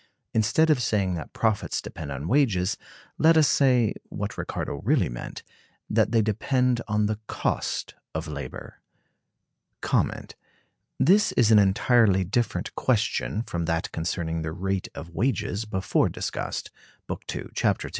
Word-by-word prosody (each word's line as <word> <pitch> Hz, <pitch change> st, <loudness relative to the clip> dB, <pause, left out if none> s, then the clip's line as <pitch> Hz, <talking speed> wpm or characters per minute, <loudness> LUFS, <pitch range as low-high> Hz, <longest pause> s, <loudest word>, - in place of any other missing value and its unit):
Instead 155 Hz, +9 st, +3 dB
of 140 Hz, -5 st, +2 dB
saying 100 Hz, -5 st, +1 dB
that 80 Hz, -3 st, -5 dB
profits 110 Hz, -3 st, 0 dB
depend 75 Hz, -3 st, -7 dB
on 70 Hz, +3 st, -4 dB
wages, 105 Hz, -8 st, +2 dB, 0.4 s
let 160 Hz, +1 st, +6 dB
us 155 Hz, -2 st, +6 dB
say 125 Hz, -6 st, +3 dB, 0.2 s
(what -, -, -4 dB
Ricardo 70 Hz, -, -4 dB
really 115 Hz, -, +2 dB
meant) -, -, -7 dB, 0.4 s
that -, -, +2 dB
they 115 Hz, -2 st, +4 dB
depend 125 Hz, +3 st, +1 dB
on 105 Hz, -1 st, +1 dB
the 105 Hz, 0 st, -1 dB
cost -, -, -2 dB, 0.2 s
of 80 Hz, +1 st, -3 dB
labor. 70 Hz, -4 st, -7 dB, 2.2 s
This 200 Hz, +8 st, +4 dB
is 115 Hz, -2 st, +4 dB
an 110 Hz, -, +8 dB
entirely 100 Hz, 0 st, +4 dB
different 110 Hz, +6 st, -1 dB
question 110 Hz, -, 0 dB
from 85 Hz, -7 st, -3 dB
that 80 Hz, 0 st, -1 dB
concerning 80 Hz, 0 st, -2 dB
the 80 Hz, 0 st, -4 dB
rate 95 Hz, +2 st, -2 dB
of 80 Hz, +5 st, -8 dB
wages 110 Hz, -1 st, -1 dB
before 95 Hz, -3 st, +1 dB
discussed -, -, -4 dB, 0.3 s
(Book -, -, -5 dB
II, -, -, -6 dB
Chap. -, -, +1 dB
II). -, -, -5 dB
105 Hz, 140 wpm, -26 LUFS, 85-120 Hz, 2.2 s, an